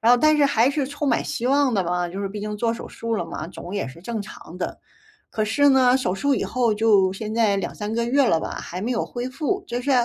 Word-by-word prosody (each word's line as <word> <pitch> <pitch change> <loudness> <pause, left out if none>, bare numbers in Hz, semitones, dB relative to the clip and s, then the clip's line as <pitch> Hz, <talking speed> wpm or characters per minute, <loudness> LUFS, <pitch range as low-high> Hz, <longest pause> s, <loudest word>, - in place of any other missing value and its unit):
然 225 - +4
后 - - +7
但 310 +4 +4
是 290 -1 +4
还 250 -1 +3
是 285 -1 -1
充 285 +2 -4
满 - - +2
希 240 - -3
望 275 -2 +3
的 190 -3 +1
嘛， 175 0 -1
就 190 +3 -6
是 - - -1
毕 205 +1 -6
竟 210 0 -4
做 230 +1 0
手 230 - -7
术 230 0 -4
了 175 - -2
嘛， 160 - -6
肿 180 +1 -8
也 200 - -1
是 135 +6 -11
正 220 +3 -4
常 180 -3 -11
的。 - - -4 0.5
可 215 - -1
是 285 +7 +3
呢， 255 -2 +5
手 185 -9 -1
术 275 +8 +1
以 - - -1
后， 245 -3 +1
就 205 -4 +4
现 215 +2 -5
在 215 -4 +3
2-3 210 +2 -4
个 235 - 0
月 275 +3 +3
了 165 -8 +3
吧， - - -4
还 180 - -6
没 230 +5 -2
有 230 - 0
恢 245 +1 -5
复。 325 +9 -2
就 240 +1 -3
是， 280 - -1
230 Hz, 285 characters per minute, -23 LUFS, 200-260 Hz, 0.5 s, 后